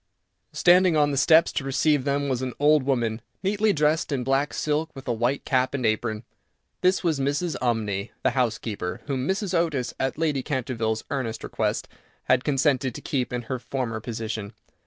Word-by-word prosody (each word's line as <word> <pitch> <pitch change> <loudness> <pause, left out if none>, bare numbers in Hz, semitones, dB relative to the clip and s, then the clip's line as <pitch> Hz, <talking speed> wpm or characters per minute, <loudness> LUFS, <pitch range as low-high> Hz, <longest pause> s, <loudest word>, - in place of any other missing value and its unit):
Standing 180 -2 +5
on 145 -1 +3
the - - -1
steps 160 +4 +5
to - - -2
receive 140 +1 +1
them 140 0 0
was 130 -2 -1
an 130 -2 -3
old 150 +1 +5
woman, 120 -4 0 0.2
neatly 205 +2 +2
dressed 155 -1 +1
in 135 -3 -1
black 135 +3 +1
silk, 155 +1 -1
with 135 - -10
a 120 - +1
white 120 +4 -1
cap 130 +1 +1
and 130 -3 -2
apron. 110 0 0 0.6
This 185 +1 +3
was 160 -5 +1
Mrs. 145 +5 -1
Umney, 110 -4 -1
the 130 - +3
housekeeper, 110 -7 -2
whom 135 -2 -2
Mrs. 190 0 -1
Otis, 160 -8 0
at 130 0 -1
Lady 155 -4 0
Canterville's 115 -5 -2
earnest 120 -6 -3
request, - - -2 0.4
had 125 0 +2
consented 135 -3 +1
to - - -7
keep 130 -4 -2
in 125 -1 -3
her 130 +2 -4
former 120 -1 -3
position. 110 -2 -5
135 Hz, 180 wpm, -25 LUFS, 120-150 Hz, 0.6 s, Standing